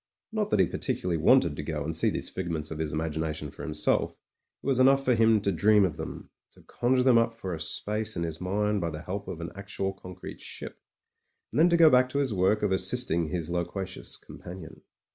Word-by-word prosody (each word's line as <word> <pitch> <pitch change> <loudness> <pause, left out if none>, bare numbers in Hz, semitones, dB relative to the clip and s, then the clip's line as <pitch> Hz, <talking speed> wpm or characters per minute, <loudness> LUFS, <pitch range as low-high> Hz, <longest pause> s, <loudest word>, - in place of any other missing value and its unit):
Not 215 -1 -1
that - - +2
he 95 - +6
particularly 85 -1 -2
wanted 125 - +5
to 75 - -4
go 75 -1 -3
and 80 +2 -3
see 80 - +2
these - - -3
figments 80 -4 -3
of 80 - -5
his 80 -1 -2
imagination 80 -1 -3
for - - -11
himself; 75 -1 0
it - - -28
was 135 -2 +2
enough 135 +1 +5
for 125 - +4
him 115 -1 +4
to 100 - +1
dream 105 +3 +4
of 90 - -3
them - - -7
— - - -62
to - - -19
conjure 125 +1 +1
them 125 -3 +6
up 115 0 0
for 95 -5 -5
a 80 - -5
space 105 +6 -2
in 85 - -1
his 80 0 -5
mind 105 +2 0
by 85 - -1
the 80 +1 -7
help 100 +4 -5
of 85 - -6
an 85 - -5
actual 95 -1 -4
concrete 90 -2 -10
ship - - -8 0.4
— - - -45
^and - - 0
then 170 +2 +6
to 170 - +4
go 160 -2 +7
back 125 0 +5
to 140 - -3
his 135 -5 +1
work 95 +3 +2
of 105 - +1
assisting 95 -3 +1
his 85 0 -3
loquacious 90 +2 -4
companion. 90 -3 -11
95 Hz, 230 wpm, -28 LUFS, 80-115 Hz, 0.4 s, go